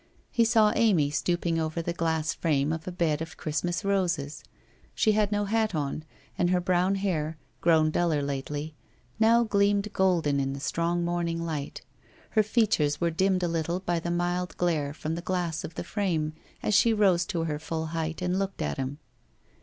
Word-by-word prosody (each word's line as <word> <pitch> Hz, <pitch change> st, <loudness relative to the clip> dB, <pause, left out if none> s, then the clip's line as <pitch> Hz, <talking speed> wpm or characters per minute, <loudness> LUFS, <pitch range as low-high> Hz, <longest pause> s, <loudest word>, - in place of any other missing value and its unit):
He 230 Hz, -2 st, +3 dB
saw 220 Hz, -2 st, +4 dB
Amy 175 Hz, -11 st, +3 dB
stooping 170 Hz, +1 st, 0 dB
over 160 Hz, +1 st, -2 dB
the 170 Hz, +1 st, -2 dB
glass 160 Hz, -2 st, 0 dB
frame 150 Hz, -2 st, +1 dB
of 160 Hz, +1 st, -6 dB
a -, -, -2 dB
bed 165 Hz, -4 st, 0 dB
of 160 Hz, -1 st, -6 dB
Christmas 170 Hz, +4 st, -2 dB
roses. 175 Hz, -7 st, -1 dB, 0.5 s
She 220 Hz, -, +3 dB
had 210 Hz, -1 st, +2 dB
no 205 Hz, 0 st, +1 dB
hat 220 Hz, -2 st, 0 dB
on, 150 Hz, +1 st, -2 dB, 0.3 s
and 175 Hz, -, +3 dB
her 180 Hz, 0 st, +3 dB
brown 180 Hz, +2 st, +2 dB
hair, 165 Hz, -6 st, -1 dB, 0.2 s
grown 160 Hz, -2 st, +4 dB
duller 160 Hz, -4 st, +1 dB
lately, 145 Hz, +2 st, -4 dB, 0.5 s
now 230 Hz, +2 st, +5 dB
gleamed 205 Hz, -1 st, +1 dB
golden 170 Hz, -7 st, +2 dB
in 135 Hz, 0 st, -1 dB
the 140 Hz, -, -6 dB
strong 170 Hz, +4 st, -1 dB
morning 170 Hz, -1 st, -1 dB
light. 150 Hz, -4 st, -4 dB, 0.5 s
Her 220 Hz, -, +4 dB
features 210 Hz, -9 st, +1 dB
were 170 Hz, -1 st, +1 dB
dimmed 185 Hz, +2 st, +1 dB
a -, -, +2 dB
little 170 Hz, +1 st, -1 dB
by 175 Hz, -2 st, -1 dB
the 170 Hz, -, -4 dB
mild 175 Hz, +1 st, -1 dB
glare 160 Hz, -5 st, 0 dB
from 155 Hz, +1 st, -3 dB
the 170 Hz, -, -3 dB
glass 175 Hz, -3 st, -2 dB
of 160 Hz, -, -7 dB
the -, -, -4 dB
frame 165 Hz, -7 st, -1 dB, 0.3 s
as 210 Hz, -, +1 dB
she 230 Hz, +3 st, +5 dB
rose 190 Hz, -5 st, +4 dB
to 170 Hz, -5 st, -1 dB
her 150 Hz, -2 st, -2 dB
full 160 Hz, +1 st, -3 dB
height 160 Hz, +1 st, -3 dB
and 180 Hz, +1 st, 0 dB
looked 195 Hz, 0 st, -2 dB
at -, -, -2 dB
him. 135 Hz, +1 st, -3 dB
170 Hz, 185 wpm, -27 LUFS, 155-190 Hz, 0.5 s, now